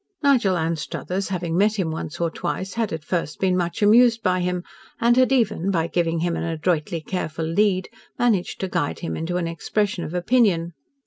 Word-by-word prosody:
Nigel 240 Hz, -10 st, +3 dB
Anstruthers, 165 Hz, +4 st, -3 dB
having 175 Hz, -3 st, -2 dB
met 210 Hz, +3 st, +3 dB
him 175 Hz, -5 st, -1 dB
once 160 Hz, +1 st, -5 dB
or 170 Hz, -1 st, 0 dB
twice, 190 Hz, +3 st, -4 dB
had 225 Hz, -2 st, -1 dB
at 160 Hz, -1 st, -5 dB
first 170 Hz, -4 st, -2 dB
been 185 Hz, -1 st, +2 dB
much 175 Hz, +2 st, -1 dB
amused 230 Hz, +2 st, +5 dB
by 185 Hz, -1 st, +2 dB
him, 180 Hz, 0 st, -1 dB, 0.4 s
and 235 Hz, +1 st, +4 dB
had 255 Hz, +1 st, +4 dB
even, 215 Hz, -7 st, +1 dB
by 165 Hz, -4 st, +1 dB
giving 165 Hz, -1 st, 0 dB
him 170 Hz, -1 st, 0 dB
an -, -, -3 dB
adroitly 165 Hz, 0 st, -1 dB
careful 160 Hz, -1 st, -3 dB
lead, 185 Hz, +2 st, +1 dB, 0.3 s
managed 220 Hz, -7 st, +1 dB
to 190 Hz, -, -1 dB
guide 80 Hz, -, -2 dB
him 80 Hz, -, -3 dB
into 175 Hz, +2 st, -2 dB
an 175 Hz, -, -1 dB
expression 190 Hz, +3 st, -1 dB
of 160 Hz, +2 st, -5 dB
opinion. 180 Hz, -4 st, +2 dB
180 Hz, 190 wpm, -23 LUFS, 165-205 Hz, 0.4 s, amused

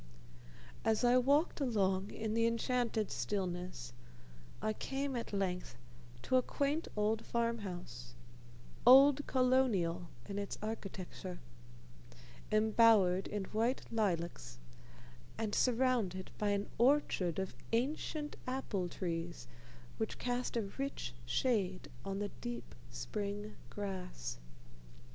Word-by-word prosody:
As 220 Hz, +2 st, +2 dB
I 245 Hz, +1 st, +6 dB
walked 285 Hz, +5 st, +3 dB
along 195 Hz, -6 st, +1 dB
in 220 Hz, -1 st, -3 dB
the 230 Hz, 0 st, +3 dB
enchanted 230 Hz, -2 st, 0 dB
stillness, 180 Hz, -10 st, -3 dB, 0.7 s
I 215 Hz, -, 0 dB
came 270 Hz, +4 st, -2 dB
at 235 Hz, -, -3 dB
length 180 Hz, -8 st, -2 dB, 0.5 s
to 255 Hz, -, +3 dB
a -, -, +5 dB
quaint 285 Hz, +5 st, -1 dB
old 215 Hz, +1 st, +1 dB
farm 235 Hz, 0 st, 0 dB
house 120 Hz, -, -7 dB, 0.7 s
"old 275 Hz, +3 st, +8 dB
Colonial" 235 Hz, -10 st, +2 dB, 0.2 s
in 200 Hz, 0 st, -4 dB
its 200 Hz, -, -4 dB
architecture 195 Hz, -, -5 dB, 1.1 s
embowered 215 Hz, -4 st, +5 dB
in 205 Hz, -1 st, -2 dB
white 230 Hz, +6 st, 0 dB
lilacs, 175 Hz, -, -1 dB, 0.8 s
and 220 Hz, -2 st, -2 dB
surrounded 235 Hz, -7 st, +2 dB
by 210 Hz, -, +2 dB
an 200 Hz, 0 st, 0 dB
orchard 235 Hz, -, +3 dB
of 190 Hz, -1 st, -3 dB, 0.2 s
ancient 295 Hz, +5 st, -1 dB
apple 215 Hz, -8 st, -1 dB
trees 165 Hz, -, -4 dB, 0.5 s
which -, -, -2 dB
cast 245 Hz, -1 st, -1 dB
a 230 Hz, -, +1 dB, 0.2 s
rich 275 Hz, -, -3 dB
shade 190 Hz, -, 0 dB
on 195 Hz, 0 st, -3 dB
the 205 Hz, 0 st, -2 dB
deep 240 Hz, 0 st, -5 dB, 0.2 s
spring 205 Hz, 0 st, -4 dB, 0.2 s
grass. 180 Hz, -, -5 dB
215 Hz, 110 wpm, -35 LUFS, 185-245 Hz, 1.1 s, old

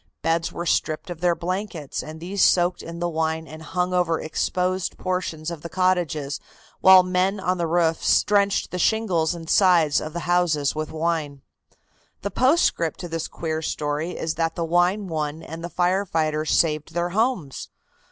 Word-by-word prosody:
Beds 165 Hz, +1 st, 0 dB
were 170 Hz, -, -5 dB
stripped 160 Hz, +2 st, -1 dB
of 170 Hz, -1 st, -8 dB
their 175 Hz, -1 st, +3 dB
blankets 180 Hz, -4 st, -4 dB
and 155 Hz, +1 st, -9 dB
these 185 Hz, +4 st, -1 dB
soaked 175 Hz, 0 st, +3 dB
in 170 Hz, 0 st, -8 dB
the 175 Hz, 0 st, -1 dB
wine 160 Hz, -1 st, -1 dB
and 155 Hz, +1 st, -10 dB
hung 180 Hz, +3 st, -2 dB
over 175 Hz, -3 st, +1 dB
exposed 180 Hz, +3 st, -1 dB
portions 175 Hz, -3 st, -3 dB
of 165 Hz, -3 st, -7 dB
the 170 Hz, -, -7 dB
cottages, 170 Hz, -6 st, 0 dB, 0.4 s
while 190 Hz, -1 st, +8 dB
men 185 Hz, +2 st, 0 dB
on 185 Hz, -1 st, -1 dB
the 170 Hz, -, 0 dB
roofs 165 Hz, -1 st, +2 dB
drenched 200 Hz, -1 st, +1 dB
the 180 Hz, -, -3 dB
shingles 180 Hz, -7 st, +1 dB
and 165 Hz, -1 st, -9 dB
sides 170 Hz, -6 st, +4 dB
of 155 Hz, 0 st, -6 dB
the 170 Hz, -, -4 dB
houses 165 Hz, -4 st, +1 dB
with 155 Hz, 0 st, -4 dB
wine. 155 Hz, -4 st, -2 dB, 0.8 s
The 200 Hz, -, -2 dB
postscript 255 Hz, -, +2 dB
to 175 Hz, -, -5 dB
this 165 Hz, -1 st, -3 dB
queer 160 Hz, -1 st, -4 dB
story 150 Hz, +2 st, -3 dB
is 160 Hz, -, -2 dB
that 165 Hz, 0 st, 0 dB
the 170 Hz, -, -2 dB
wine 175 Hz, +5 st, +2 dB
won 155 Hz, -1 st, -3 dB
and 165 Hz, +1 st, -8 dB
the 175 Hz, -, -4 dB
firefighters 165 Hz, -3 st, 0 dB
saved 155 Hz, -1 st, +1 dB
their 175 Hz, 0 st, 0 dB
homes. 200 Hz, -, -1 dB
170 Hz, 170 wpm, -23 LUFS, 160-180 Hz, 0.8 s, while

